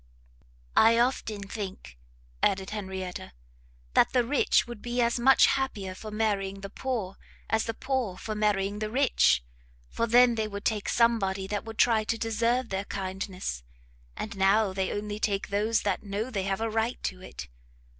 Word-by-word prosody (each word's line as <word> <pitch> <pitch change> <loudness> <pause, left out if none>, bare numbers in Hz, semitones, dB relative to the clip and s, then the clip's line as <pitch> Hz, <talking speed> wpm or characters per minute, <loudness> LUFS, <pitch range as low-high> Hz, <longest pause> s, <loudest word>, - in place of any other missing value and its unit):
"I 225 +1 +6
often 235 -4 0
think," 195 - -7 0.5
added 190 0 +1
Henrietta, 190 - -5 0.6
"that - - +4
the 250 -2 +4
rich 270 +4 +2
would 240 -3 -9
be 240 +1 -3
as 235 0 +2
much 265 +2 +6
happier 210 -9 -1
for 215 +3 -8
marrying 200 -3 -1
the 195 0 -7
poor, 225 -8 -3 0.3
as 220 0 +2
the 225 - -3
poor 255 -9 -2
for 215 - -5
marrying 205 -1 0
the 215 0 -2
rich, 255 - +3 0.5
for 230 - -1
then 245 +1 +6
they 220 -1 -1
would 200 -1 -7
take 215 -2 0
somebody 200 -5 +2
that 205 +2 -3
would 225 -1 -8
try 225 -3 +4
to 230 +1 -1
deserve 230 +2 0
their 195 +1 -2
kindness, 190 - -4 0.6
and 220 -1 -5
now 195 +1 +3
they 190 -1 -1
only 205 0 -4
take 200 -2 -1
those 210 +3 +1
that 200 -2 0
know 210 +4 -4
they 195 -5 -2
have 195 +1 -1
a 225 - +1
right 225 +2 -1
to 185 -1 -3
it. 130 - -8
210 Hz, 170 wpm, -28 LUFS, 195-230 Hz, 0.6 s, I